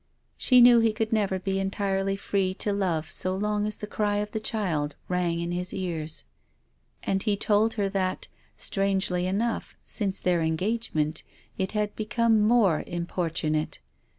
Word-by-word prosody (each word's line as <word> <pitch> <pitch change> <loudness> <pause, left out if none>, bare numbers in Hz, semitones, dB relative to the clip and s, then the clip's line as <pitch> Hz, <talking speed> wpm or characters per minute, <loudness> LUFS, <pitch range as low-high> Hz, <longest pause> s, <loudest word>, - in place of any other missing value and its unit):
She 250 -2 +5
knew 240 -1 +8
he 225 -1 +3
could 220 0 -2
never 200 -3 +1
be 190 +1 -2
entirely 195 0 0
free 195 -1 -1
to 205 0 0
love 175 -6 -1
so 185 0 +2
long 210 +1 0
as 215 - -4
the - - -5
cry 205 0 -1
of 210 0 -2
the 220 - -2
child 175 -10 -1
rang 175 -2 0
in 170 0 -2
his 180 +1 -3
ears. 165 -4 -3 0.8
And 195 0 0
he 205 -1 +1
told 210 +2 +2
her 205 -2 +1
that, 190 -2 -2 0.3
strangely 190 -2 0
enough, 220 +5 -1
since 200 -3 -1
their 175 -2 +1
engagement 160 -2 0 0.4
it 190 +2 -1
had 210 -1 -1
become 220 +1 +2
more 210 -7 +4
importunate. 165 -3 -2
195 Hz, 155 wpm, -27 LUFS, 180-210 Hz, 0.8 s, knew